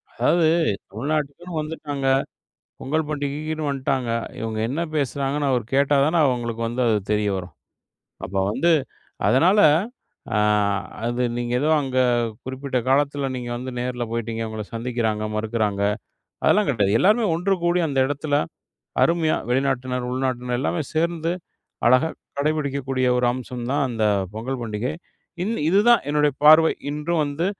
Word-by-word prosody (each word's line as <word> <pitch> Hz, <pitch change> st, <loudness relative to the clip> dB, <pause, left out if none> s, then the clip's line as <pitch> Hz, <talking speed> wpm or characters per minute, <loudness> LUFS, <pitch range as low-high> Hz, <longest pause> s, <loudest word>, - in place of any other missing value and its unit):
அதாவது 170 Hz, -2 st, +3 dB, 0.5 s
தமிழ்நாட்டுக்குன்னு 150 Hz, -, -3 dB
வந்துட்டாங்க, 145 Hz, -3 st, -5 dB, 0.7 s
பொங்கல் 155 Hz, +3 st, -1 dB
பண்டிகைக்குன்னு 150 Hz, +1 st, -3 dB
வன்ட்டாங்க. 135 Hz, -3 st, -1 dB, 0.3 s
இவங்க 110 Hz, -1 st, -3 dB
என்ன 145 Hz, +6 st, -2 dB
பேசுறாங்கன்னு 140 Hz, 0 st, -1 dB
அவரு 125 Hz, -4 st, +1 dB
கேட்டா 140 Hz, +1 st, +3 dB
தானே, 165 Hz, +3 st, +2 dB
அவங்களுக்கு 120 Hz, -2 st, -2 dB
வந்து 120 Hz, +2 st, -3 dB
அது 110 Hz, -, +3 dB, 0.2 s
தெரிய 105 Hz, -1 st, +1 dB
வரும். 90 Hz, -2 st, -7 dB, 0.7 s
அப்ப 100 Hz, -, -9 dB, 0.2 s
வந்து 170 Hz, +8 st, +2 dB, 0.6 s
அதனால, 165 Hz, -, +4 dB, 0.8 s
அ, -, -, +3 dB, 0.7 s
அது 120 Hz, +1 st, 0 dB
நீங்க 120 Hz, 0 st, -2 dB
ஏதோ 155 Hz, -, +1 dB
அங்க 130 Hz, -2 st, -3 dB, 0.5 s
குறிப்பிட்ட 130 Hz, 0 st, -3 dB
காலத்துல, 140 Hz, 0 st, +1 dB
நீங்க 120 Hz, -1 st, -5 dB
வந்து 130 Hz, +1 st, -6 dB
நேருல 125 Hz, -1 st, -2 dB
போயிட்டிங்க. 115 Hz, -1 st, -3 dB
உங்கள 110 Hz, -1 st, -5 dB
சந்திக்குறாங்க, 115 Hz, -2 st, -1 dB
மறுக்குறாங்க, 110 Hz, -2 st, -1 dB, 0.6 s
அதெல்லாம் 210 Hz, -4 st, +4 dB
கெடயாது 105 Hz, -2 st, +2 dB
எல்லாருமே 215 Hz, +3 st, +4 dB
ஒண்ணு 190 Hz, +3 st, +1 dB
கூடி 175 Hz, 0 st, +2 dB
அந்த 135 Hz, -2 st, +1 dB
இடத்துல, 145 Hz, 0 st, -1 dB, 0.7 s
அருமையா 170 Hz, -2 st, +2 dB
வெளிநாட்டினர், 130 Hz, -1 st, 0 dB
உள்நாட்டினர் 125 Hz, -2 st, -1 dB
எல்லாமே 160 Hz, +3 st, -1 dB
சேர்ந்து 165 Hz, +1 st, 0 dB, 0.6 s
அழகா 130 Hz, +6 st, +4 dB, 0.3 s
கடைபிடிக்கக்கூடிய, 140 Hz, -4 st, 0 dB
ஒரு 125 Hz, -, +1 dB
அம்சம் 125 Hz, -1 st, -6 dB
தான் 145 Hz, -1 st, +1 dB
அந்த 115 Hz, -2 st, -2 dB, 0.3 s
பொங்கல் 125 Hz, +3 st, -4 dB
பண்டிகை. 115 Hz, +5 st, -3 dB, 0.5 s
இது 215 Hz, -, -1 dB, 0.2 s
இதுதான் 215 Hz, +5 st, +5 dB
என்னுடைய 150 Hz, 0 st, +3 dB
பார்வை 155 Hz, +2 st, +8 dB, 0.2 s
இன்றும் 155 Hz, +2 st, -1 dB
வந்து 145 Hz, +5 st, -2 dB
135 Hz, 130 wpm, -23 LUFS, 120-155 Hz, 0.8 s, பார்வை